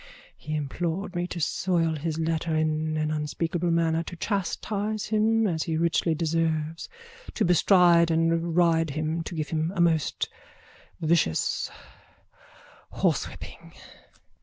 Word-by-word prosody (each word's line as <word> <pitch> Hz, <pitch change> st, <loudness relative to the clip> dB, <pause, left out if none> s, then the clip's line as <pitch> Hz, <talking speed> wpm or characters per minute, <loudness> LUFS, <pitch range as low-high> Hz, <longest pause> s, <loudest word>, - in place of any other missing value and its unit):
He 140 Hz, -, -5 dB
implored 170 Hz, +6 st, -3 dB
me 175 Hz, 0 st, -1 dB
to 180 Hz, -, -6 dB
soil 165 Hz, 0 st, 0 dB
his 155 Hz, +1 st, -3 dB
letter 160 Hz, 0 st, -1 dB
in 155 Hz, 0 st, 0 dB
an 155 Hz, 0 st, 0 dB
unspeakable 160 Hz, +3 st, -2 dB
manner, 165 Hz, -1 st, +2 dB
to 170 Hz, -, -7 dB
chastise 205 Hz, +3 st, -2 dB
him 220 Hz, +1 st, +2 dB
as 165 Hz, -6 st, 0 dB
he 160 Hz, -1 st, -1 dB
richly 165 Hz, 0 st, +1 dB
deserves, 160 Hz, 0 st, -1 dB, 0.5 s
to -, -, +1 dB
bestride 175 Hz, -1 st, +5 dB
and 165 Hz, 0 st, +1 dB
ride 165 Hz, -2 st, +3 dB
him, 155 Hz, +3 st, -2 dB
to 165 Hz, -, -6 dB
give 155 Hz, -2 st, -3 dB
him 160 Hz, +1 st, -1 dB
a -, -, -4 dB
most 165 Hz, -3 st, +1 dB, 0.7 s
vicious 155 Hz, -, +1 dB, 1.2 s
horsewhipping. -, -, -3 dB
165 Hz, 125 wpm, -26 LUFS, 155-175 Hz, 1.2 s, bestride